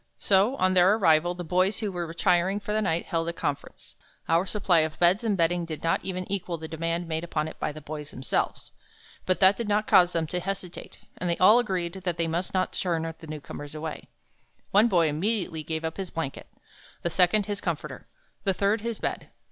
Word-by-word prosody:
So, 200 +6 +3
on 185 -7 +2
their 185 +3 +5
arrival, 175 -3 +3
the 175 - -5
boys 185 +4 +1
who 210 -3 -2
were 175 -2 -3
retiring 175 +4 +1
for 210 +1 -4
the 215 - +1
night, 170 -4 0
held 165 0 -1
a - - -3
conference. 145 -4 -5 0.3
Our 170 +4 +2
supply 190 -5 +2
of 155 0 -1
beds 180 +6 +3
and 210 -4 +1
bedding 175 +1 +2
did 160 -2 -6
not 165 - +1
even 185 -1 -3
equal 180 -3 -2
the 160 0 -7
demand 165 +2 -2
made 160 0 -2
upon 155 -2 -2
it - - -10
by - - -1
the 155 +1 -10
boys 150 0 -7
themselves. 130 - -2 0.6
But 185 - +2
that 190 +1 +6
did 235 - -3
not 210 +1 +1
cause 180 -3 +5
them 165 -1 0
to 180 +3 -3
hesitate, 185 -1 -6 0.2
and 175 -1 0
all 210 +6 +7
agreed 185 -7 -1
that 175 -2 -1
they 165 - +1
must 170 +3 -2
not 185 -1 0
turn 165 -3 -1
the 160 - -11
newcomers 150 -1 -8
away. 155 0 -6 0.6
One 210 +4 +5
boy 175 -7 +3
immediately 170 +1 -1
gave 160 +1 -4
up 160 - -4
his 190 -2 -4
blanket, 160 -5 -5 0.6
the 170 - -1
second 185 +4 +3
his 205 -1 -4
comforter, 170 -5 -4 0.4
the 195 -2 +1
third 205 +3 +1
his 230 -1 -3
bed. - - -4
175 Hz, 210 wpm, -27 LUFS, 165-195 Hz, 0.6 s, all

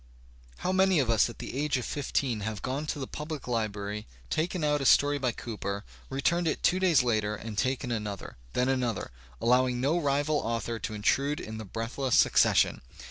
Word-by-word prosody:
How 185 - -1
many 190 -1 +4
of 130 -6 +2
us 110 0 +4
at 120 - -10
the - - -7
age 145 0 +1
of 125 - -3
fifteen 135 -4 -1
have 105 -1 -4
gone 140 +4 -2
to - - -2
the 135 - -3
public 150 +1 -6
Ubrary, 105 -3 -3 0.3
taken 170 +1 -1
out 150 -1 +2
a - - -2
story 145 0 +5
by 130 -2 +1
Cooper, 105 -3 -5 0.2
returned 165 +6 +1
it - - -1
two 185 - +3
days 170 -8 +4
later 110 -3 +1
and 110 0 -7
taken 130 +2 0
another, 105 - -4 0.2
then 125 - +1
another, 125 - -1 0.3
allowing 125 +1 +3
no 145 +7 +2
rival 145 0 +1
author 115 -2 -2
to 110 - -4
intrude 140 +8 +1
in 110 0 -6
the 110 - -6
breathless 115 +5 -2
succession! - - +4
130 Hz, 190 wpm, -29 LUFS, 110-145 Hz, 0.3 s, story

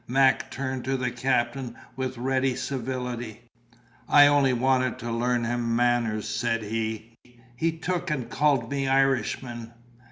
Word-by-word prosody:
Mac 135 +1 +3
turned 130 -1 -4
to 135 +1 0
the 125 -1 -1
captain 120 0 -1 0.2
with 130 -1 -3
ready 130 +1 0
civility. 120 -3 -4 0.7
"I 145 0 +8
only 145 -2 +4
want 130 +1 +1
to 120 -1 -5
learn 120 +1 0
him 115 0 -1
manners," 120 -3 +1
said 115 -2 -1
he. 110 +1 -4 0.4
"He 160 +6 0
took 180 +1 -2
and 135 -6 -2
called 140 -5 +1
me 135 -1 -1
Irishman." 130 -3 0
125 Hz, 135 wpm, -26 LUFS, 120-135 Hz, 0.7 s, I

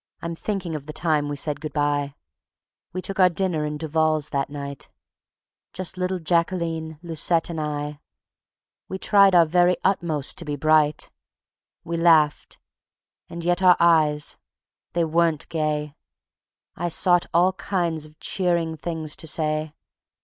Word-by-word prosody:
.)..... - - -46
I'm 170 0 -3
thinking 180 -1 -4
of 150 -2 -6
the 155 - -6
time 150 -3 0
we 145 - -3
said 145 +1 -2
good 155 -2 -6
by: 145 -1 0 0.8
We 185 0 -5
took 195 0 -3
our 185 -1 +7
dinner 170 -4 -1
in 150 0 -4
Duval's 155 -1 0
that 140 0 -1
night, 140 -2 -7 0.8
Just 185 -1 -5
little 185 +1 -1
Jacqueline, 165 -2 -1
Lucette 165 0 0
and 160 -2 -3
I; 150 -1 -4 0.9
We 190 - -4
tried 195 -1 +4
our 170 -1 +7
very 175 +2 +3
utmost 165 -7 0
to 170 - -6
be 145 -1 -3
bright. 155 0 +2 0.7
We 170 0 -3
laughed. 160 -3 +3 0.7
And 170 0 -7
yet 175 +1 +1
our 180 -1 +6
eyes, 155 -3 +3 0.6
they 170 -1 +1
weren't 165 -1 +1
gay. 150 -2 -2 0.8
I 175 - -2
sought 175 +1 +3
all 180 +3 +3
kinds 175 -4 -2
of 155 0 -22
cheering 170 -3 -1
things 160 -1 -4
to 160 - -7
say. 155 0 -1
160 Hz, 150 wpm, -23 LUFS, 150-175 Hz, 0.9 s, our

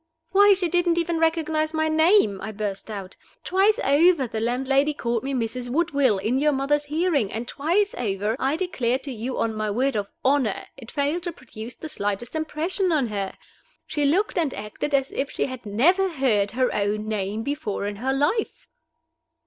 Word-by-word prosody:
"Why, 405 +1 +7
she 370 -2 0
didn't 345 0 +2
even 335 -1 0
recognize 320 -1 +1
my 315 0 +1
name!" 315 - +4
I 215 - -5
burst 205 -1 -4
out. 195 -3 -6 0.3
"Twice 395 +4 +3
over 300 0 +4
the 225 -2 -4
landlady 270 +5 +1
called 235 -4 -1
me 275 - -4
Mrs. 245 -1 -2
Woodville 280 - +2
in 220 +7 0
your 300 +1 +3
mother's 290 +2 +1
hearing, 300 - 0
and 230 +3 -4
twice 365 +11 0
over, 210 -1 -1
I 270 +3 +1
declare 265 -9 0
to 275 +1 -8
you 245 +2 -4
on 225 -1 0
my 215 0 -2
word 255 +5 0
of 205 -1 -1 0.2
honor, 265 -6 +1
it 245 -4 -12
failed 295 +4 -1
to 345 0 -4
produce 245 -5 -9
the 315 - -8
slightest 205 -2 -3
impression 330 +4 -1
on 280 -7 +1
her. 200 -2 -3 0.5
She 295 -2 -1
looked 360 +6 +2
and 310 -6 0
acted 210 +8 -3
as 270 -1 0
if 275 - -2
she - - -1
had 255 -4 -7
never 350 - +3
heard 250 - +1
her 255 -1 +2
own 210 +1 -1
name 210 0 -2
before 280 -8 -3
in 205 0 -4
her 260 +5 -1
life." 290 - -1
270 Hz, 185 wpm, -24 LUFS, 220-320 Hz, 0.5 s, Why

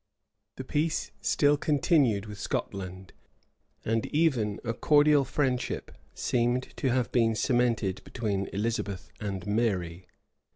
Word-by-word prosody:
The 130 - -6
peace 155 +4 -1
still 145 0 +3
continued 140 - +2
with 105 -2 -9
Scotland 95 0 -4 0.7
and 115 0 0
even 130 -10 +1
a 115 -2 -2
cordial 145 +1 +4
friendship 130 -2 -1 0.2
seemed 120 +1 0
to 135 - 0
have 125 -1 0
been 115 -2 +3
cemented 115 -5 +1
between 100 -5 -2
Elizabeth 105 -2 -3
and 95 -4 -4
Mary. 95 -5 -1
115 Hz, 115 wpm, -28 LUFS, 100-130 Hz, 0.7 s, cordial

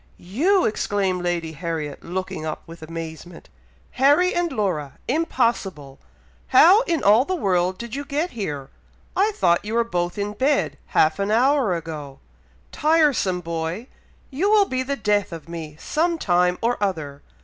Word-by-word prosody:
"You!!!" 325 - +1
exclaimed 195 -4 0
Lady 175 -2 -2
Harriet, 160 -2 -5
looking 180 -3 -4
up 155 -1 -5
with 165 0 -12
amazement. 165 +1 -8 0.4
"Harry 290 +8 +3
and 345 -1 0
Laura!! 155 -10 -2
impossible! 230 - -1 0.5
how 380 +7 +7
in 335 -2 0
all 215 +5 +6
the 370 +6 -2
world 185 - 0
did 235 -1 -8
you 280 +1 -3
get 300 +5 -2
here? 150 - -5 0.4
I 405 +3 +3
thought 170 - +2
you 215 +2 -4
were 235 - +3
both 175 -5 -2
in 205 0 -2
bed 275 +6 0
half 155 +4 +2
an 200 +1 -1
hour 245 -2 +3
ago! 155 -4 -7 0.5
Tiresome 295 - +2
boy! 165 +5 -4 0.5
you 335 +10 0
will 420 -1 +5
be 260 -7 -2
the 275 +2 -2
death 210 -5 0
of 165 -1 -8
me 160 -3 -7
some 335 +2 0
time 180 - +2
or 235 -1 0
other! 155 -8 -3
200 Hz, 155 wpm, -23 LUFS, 165-275 Hz, 0.5 s, how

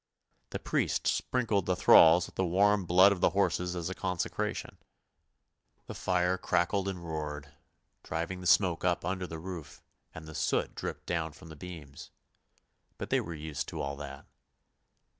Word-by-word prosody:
The - - -4
priest - - -1
sprinkled 110 -7 0
the 90 - +2
thralls 85 0 +7
with - - -13
the 95 - 0
warm 100 +2 +3
blood 95 +3 +6
of 95 -3 -2
the - - +5
horses 90 -2 0
as 85 -2 -3
a 95 - -3
consecration. 90 -2 -3 1.1
The - - -7
fire 90 0 0
crackled 90 +2 +1
and 90 -3 -5
roared, 75 -2 -5 0.5
driving 85 +3 -4
the 90 - -3
smoke 90 -2 +3
up 90 -2 +1
under 90 0 -2
the 80 - -6
roof, 85 -3 -8 0.3
and 80 - -8
the 80 - -9
soot - - 0
dripped - - -6
down 80 -3 -2
from 80 +2 -14
the 80 - -10
beams; 75 -3 -10 0.9
but - - -6
they - - +3
were 85 0 -6
used 75 -1 -5
to - - -6
all 70 0 -3
that. 70 -1 -8
90 Hz, 165 wpm, -30 LUFS, 80-95 Hz, 1.1 s, thralls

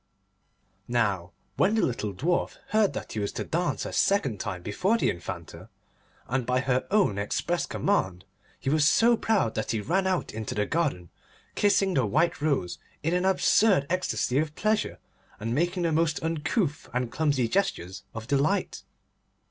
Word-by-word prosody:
Now 100 -7 0 0.3
when 210 +3 +3
the 220 - +2
little 110 -4 -2
Dwarf 170 - -1
heard 215 -1 +3
that - - -6
he 110 - -3
was 100 - -2
to - - -3
dance 175 +2 -1
a - - -5
second 135 - +1
time 90 -2 -4
before 185 - +1
the - - +2
Infanta, 85 - -8 0.6
and 130 +1 0
by 125 +1 +1
her 130 0 0
own 195 - +2
express 170 +11 -1
command, 95 - -1 0.3
he 135 - -1
was 155 0 +3
so 235 +8 +5
proud 215 - +1
that 110 - -3
he 110 - 0
ran 190 - 0
out 185 -2 -1
into 110 -1 -4
the 105 -1 +1
garden, 135 - -1 0.4
kissing 200 -2 +2
the 130 -8 +2
white 155 +8 +1
rose 140 - 0 0.2
in 165 +3 0
an 180 +1 +1
absurd 190 -3 +4
ecstasy 185 -7 0
of 155 0 -2
pleasure, 215 +1 0 0.4
and 115 +2 -2
making 175 +5 0
the 165 - +1
most 160 0 +1
uncouth 160 - -1
and 125 -2 -1
clumsy 145 -6 +1
gestures 100 - -1
of 115 0 -6
delight. 145 +9 0
150 Hz, 165 wpm, -27 LUFS, 115-185 Hz, 0.6 s, so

